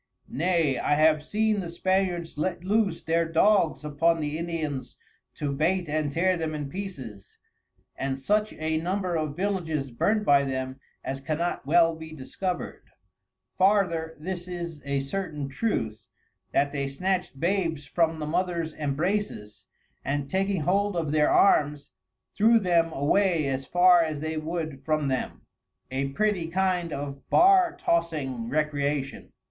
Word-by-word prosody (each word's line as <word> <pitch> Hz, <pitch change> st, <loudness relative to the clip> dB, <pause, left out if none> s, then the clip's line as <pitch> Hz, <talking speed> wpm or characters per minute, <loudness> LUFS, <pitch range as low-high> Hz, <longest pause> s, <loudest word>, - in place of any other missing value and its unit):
Nay, 165 Hz, -4 st, +1 dB
I 145 Hz, -, +2 dB
have 155 Hz, 0 st, +4 dB
seen 215 Hz, +6 st, 0 dB
the 175 Hz, -3 st, -4 dB
Spaniards 180 Hz, -1 st, -1 dB
let 170 Hz, +3 st, -2 dB
loose 200 Hz, -3 st, +1 dB
their 165 Hz, 0 st, 0 dB
Dogs 165 Hz, -4 st, +3 dB
upon 165 Hz, +3 st, +2 dB
the 150 Hz, -1 st, -2 dB
Indians 160 Hz, -5 st, -4 dB, 0.4 s
to 145 Hz, -1 st, -2 dB
bait 170 Hz, +5 st, 0 dB
and 150 Hz, -1 st, -1 dB
tear 185 Hz, +5 st, +2 dB
them 160 Hz, -2 st, -3 dB
in 145 Hz, -2 st, -4 dB
pieces, 130 Hz, -, -8 dB, 0.6 s
and 135 Hz, 0 st, -2 dB
such 210 Hz, +10 st, +1 dB
a 155 Hz, 0 st, -1 dB
Number 180 Hz, +1 st, -1 dB
of 155 Hz, -2 st, -2 dB
Villages 165 Hz, -8 st, -2 dB
burnt 210 Hz, -, +1 dB
by 140 Hz, -1 st, +5 dB
them 130 Hz, -1 st, -3 dB, 0.2 s
as 135 Hz, 0 st, -4 dB
cannot 155 Hz, +1 st, -2 dB
well 165 Hz, +1 st, +4 dB
be 160 Hz, 0 st, -9 dB
discover'd: 175 Hz, +6 st, -5 dB, 0.7 s
Farther 180 Hz, -5 st, +2 dB
this 175 Hz, +2 st, -5 dB
is 170 Hz, -4 st, -6 dB
a 140 Hz, -1 st, 0 dB
certain 150 Hz, -1 st, -4 dB
Truth, 125 Hz, -, -2 dB, 0.4 s
that 140 Hz, 0 st, +2 dB
they 140 Hz, -2 st, -2 dB
snatched 180 Hz, +1 st, -2 dB
Babes 165 Hz, -3 st, 0 dB
from 165 Hz, +2 st, +1 dB
the 155 Hz, -, -4 dB
Mothers 170 Hz, 0 st, -1 dB
Embraces, 150 Hz, -, -3 dB, 0.4 s
and 140 Hz, 0 st, -2 dB
taking 190 Hz, +2 st, 0 dB
hold 200 Hz, +5 st, +1 dB
of 160 Hz, -4 st, -1 dB
their 150 Hz, -1 st, +3 dB
Arms 145 Hz, -6 st, +3 dB, 0.4 s
threw 225 Hz, +3 st, +5 dB
them 170 Hz, -5 st, +2 dB
away 165 Hz, +3 st, +2 dB
as 135 Hz, -1 st, -2 dB
far 175 Hz, 0 st, +6 dB
as 155 Hz, -3 st, -2 dB
they 155 Hz, +1 st, -3 dB
would 155 Hz, -3 st, -4 dB
from 155 Hz, -1 st, 0 dB
them: 130 Hz, -1 st, -3 dB, 0.5 s
(a 135 Hz, +1 st, -1 dB
pretty 185 Hz, +3 st, 0 dB
kind 180 Hz, -1 st, 0 dB
of 140 Hz, -1 st, -5 dB
barr 370 Hz, 0 st, +5 dB
tossing 145 Hz, -9 st, -1 dB
Recreation.) 145 Hz, -1 st, -1 dB
160 Hz, 145 wpm, -26 LUFS, 145-185 Hz, 0.7 s, far